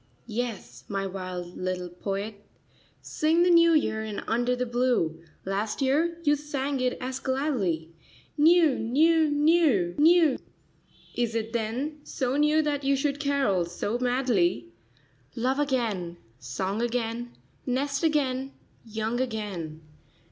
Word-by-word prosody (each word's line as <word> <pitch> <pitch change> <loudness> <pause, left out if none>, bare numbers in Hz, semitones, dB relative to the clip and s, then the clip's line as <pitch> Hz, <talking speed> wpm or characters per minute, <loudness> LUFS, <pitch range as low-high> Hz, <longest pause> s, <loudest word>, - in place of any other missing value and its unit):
Yes, 230 -2 -5
my 195 -1 -2
wild 185 -2 -6
little 185 -1 -3
poet. 200 +3 -5 0.6
Sing 320 +3 +2
the 355 - +4
new 335 0 +6
year 220 -8 +1
in 215 -2 -5
under 240 +2 0
the 250 0 -1
blue. 240 -10 0 0.2
Last 200 +3 -2
year 310 +5 +1
you 295 -2 +4
sang 285 -2 -3
it 255 0 0
as 260 +1 -4
gladly. 235 - -1 0.4
"New, 320 -1 +5
new, 310 +7 +3
new, 290 - +3
new 320 -2 +5 0.4
/" - - -29
Is 235 -2 -1
it 225 0 -2
then 245 +7 -2
so 255 0 -2
new 300 +2 +3
That 290 -2 -1
you 275 +1 +3
should 280 +1 -1
carol 280 - +1
so 205 +7 -3
madly? 240 - +1 0.3
" 135 -2 -35
Love. 260 +4 0
again, 225 -12 -1 0.2
song 190 - -3
again, 240 0 -2 0.3
nest 275 +2 -1
again, 275 -4 0 0.3
young 225 +2 -2
again!' 200 -10 -4
245 Hz, 135 wpm, -27 LUFS, 200-290 Hz, 0.6 s, new